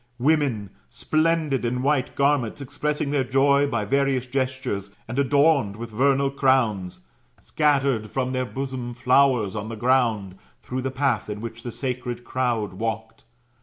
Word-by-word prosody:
Women, 130 -7 +1 0.2
splendid 155 -4 0
in 125 +2 -1
white 140 -2 0
garments, 140 -5 +1
ex 140 -2 -9
pressing 150 -1 -1
their 140 -2 +2
joy 140 +2 +3
by 115 -6 -1
various 135 +1 +1
gestures, 130 -6 -2 0.2
and 120 +4 -3
adorned 140 -5 +3
with 115 +1 -7
vernal 135 +4 +2
crowns, 120 - +1 0.4
scattered 140 -7 +1
from 130 +3 -2
their 130 -1 -1
bosoms 125 -2 -5
flowers 125 -5 +3
otk 110 0 -5
the 115 - -5
ground, 110 -5 +1 0.2
through 130 +1 -4
the 135 - -2
path 130 -5 0
in 105 0 -4
which 115 +1 -7
the 120 - -6
sacred 125 -1 -4
crowd 120 -6 -1
walked. 110 +2 -5
130 Hz, 150 wpm, -24 LUFS, 115-140 Hz, 0.4 s, joy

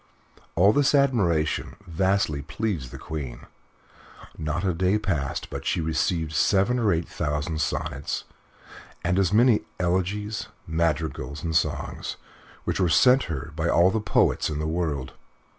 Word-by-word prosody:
All 100 +5 +5
this 145 0 +3
admiration 100 - +1
vastly 95 -3 0
pleased 80 - -3
the - - -9
Queen. 65 -6 -6 0.9
Not 80 +2 -3
a 95 -2 +1
day 95 +4 +2
passed 85 -11 -2
but - - -5
she - - 0
received 80 0 0
seven 100 +9 +3
or 110 -3 +3
eight 85 0 0
thousand 75 +2 -2
sonnets, 70 -2 -2 0.8
and 90 +2 +1
as 95 -2 +2
many 115 +1 +5 0.2
elegies, 100 +4 -1 0.2
madrigals, 80 -2 -2
and 80 -1 -2
songs, 80 - -1 0.5
which - - -2
were 90 -3 +3
sent 125 +11 +5
her 75 -1 -5
by 85 +1 0
all 90 +2 +5
the 110 - 0
poets 105 - +2
in 75 - -3
the 75 - -2
world. 80 -5 -2
85 Hz, 140 wpm, -25 LUFS, 80-100 Hz, 0.9 s, All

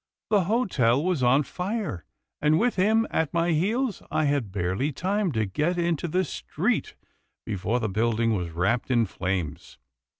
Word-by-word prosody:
The 200 -4 +4
hotel 150 - +2
was 180 -5 0
on 130 +4 +4
fire, 185 - -4 0.4
and, 150 +1 +4
with 240 +5 +1
him 220 +4 +3
at 160 -2 0
my 170 +1 +2
heels, 210 - 0
I 155 - +1
had 140 -8 0
barely 95 +9 -1
time 190 +5 -1
to 110 -2 +1
get 150 - -1
into 170 -1 0
the 185 +4 +1
street, - - -2 0.5
before 105 +3 -1
the 110 - -1
building 115 +2 +1
was 90 -3 -3
wrapped 95 +11 0
in 120 -3 +3
flames." 95 -4 -4
145 Hz, 160 wpm, -26 LUFS, 110-185 Hz, 0.5 s, The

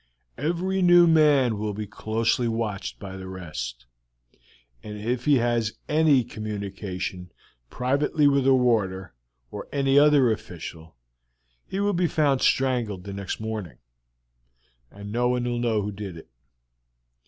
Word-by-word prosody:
"Every 175 +6 -1
new 175 -1 +7
man 145 -9 +4
will 105 -1 -3
be 105 +1 -4
closely 115 +3 -1
watched 110 -3 -3
by 95 -1 -8
the 95 0 -8
rest, 60 -10 -7 1.0
and 105 0 -8
if 120 +4 -3
he 150 -1 +5
has 120 -2 0
any 150 -4 +4
communication 100 -5 -6 0.4
privately 140 +4 +1
with 140 -1 +2
a 135 - +6
warder 100 - 0 0.4
or - - -7
any 140 0 +3
other 145 -5 +5
official 85 - -7 0.7
he 190 - -4
will 205 0 +1
be 175 -1 +1
found 145 -5 +1
strangled 120 -8 +1
the 100 0 -7
next 100 -1 -5
morning; 110 - -5 1.1
no 105 +5 -2
one 125 -1 0
will 120 -1 -2
know 115 -3 0
who 105 - -3
did 100 -4 -7
it. 80 - -13
115 Hz, 135 wpm, -25 LUFS, 100-135 Hz, 1.1 s, new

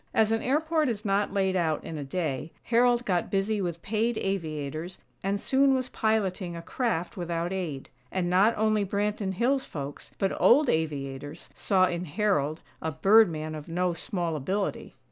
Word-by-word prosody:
As 220 0 +4
an 225 - +1
airport 310 +2 +1
is 220 -2 -4
not 200 0 +1
laid 190 -1 +1
out 160 -4 0
in 160 - -6
a 150 - -4
day, 150 0 -3
Harold 240 0 +3
got 180 -3 0
busy 200 +2 0
with 170 -2 -3
paid 225 +2 0
aviators 160 -2 -3 0.3
and 200 +1 0
soon 270 +4 +3
was 255 -1 -2
piloting 195 -5 0
a 170 - -6
craft 200 -6 -2
without 170 0 -2
aid; 160 -8 -4 0.2
and 185 -2 -1
not 195 +6 +4
only 215 -1 +2
Branton 200 0 -1
Hills 260 +6 +1
folks, 140 -1 -7
but 195 - 0
old 280 +2 +6
aviators, 145 -1 -3
saw 190 -2 +3
in 175 0 -2
Harold, 155 -3 0 0.2
a 160 - -2
"bird 205 +6 +6
man" 155 -1 -4
of 150 -1 -7
no 180 +1 0
small 175 -4 -2
ability. 190 +8 -2
190 Hz, 170 wpm, -28 LUFS, 160-220 Hz, 0.3 s, old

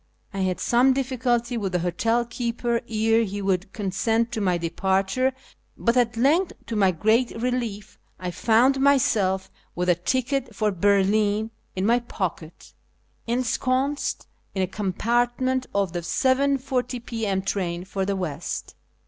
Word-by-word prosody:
I 195 - -4
had 185 -1 0
some 250 +2 +4
difficulty 250 -2 0
with 195 -4 -3
the - - +3
hotel 225 +8 0
keeper 235 0 -2
ere 225 +1 +2
he 205 -1 -4
would 190 -1 -1
consent 225 +4 0
to 220 - -2
my 180 -3 +2
departure, 190 +8 0 0.5
but 235 +1 +1
at 235 -2 +2
length, 315 +9 +3
to 230 - -4
my 195 -3 +4
great 220 +8 +1
relief, 235 -4 -3 0.2
I 180 -1 -4
found 240 +8 +3
myself, 215 -9 +2 0.2
with 180 +1 -1
a - - +7
ticket 255 - -1
for 215 0 +1
Berlin 205 +3 +2 0.2
in 190 +1 -1
my 235 +3 +4
pocket, 180 -8 -5 0.5
ensconced 255 +4 0 0.3
in 190 - +1
a - - 0
compartment 240 +7 0
of 195 -3 0
the 175 - -2
7.40 260 +1 0
p.m. 210 -5 -2
train 180 -3 -2
for 195 0 -3
the 200 +1 -1
west. 170 -4 -4
225 Hz, 140 wpm, -24 LUFS, 190-245 Hz, 0.5 s, a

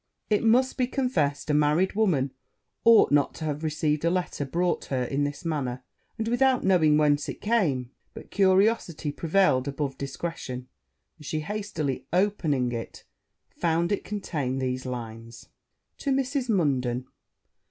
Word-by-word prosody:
It 210 - +3
must 250 +4 +3
be 250 -2 +1
confessed, 160 - 0
a - - +1
married 150 +5 +3
woman 170 -11 +1 0.5
ought 230 -1 +6
not 145 -1 +3
to 160 - -5
have 150 0 -3
received 155 -1 0
a 170 - +3
letter 175 -5 -2
brought 175 +6 -1
her 130 -2 -1
in 140 +3 -1
this 145 +4 -5
manner, 130 -6 -2 0.3
and 225 -1 -2
without 255 +2 +2
knowing 160 -6 +4
whence 145 -1 +2
it - - -6
came: 155 - 0 0.2
but - - -11
curiosity 190 -5 +2
prevailed 160 -4 +2
above 140 -1 -3
discretion; 135 -3 -5 0.5
and 150 - -14
she, 155 - -2
hastily 165 -6 -3
opening 160 -9 +1
it, 115 -1 -6 0.5
found 170 +1 0
it 205 - 0
contained 145 -11 -3
these 130 0 -2
lines. 115 -1 -7 0.5
'To 280 - -3
Mrs. 265 -1 0
Munden. 130 - +1
155 Hz, 145 wpm, -26 LUFS, 135-200 Hz, 0.5 s, ought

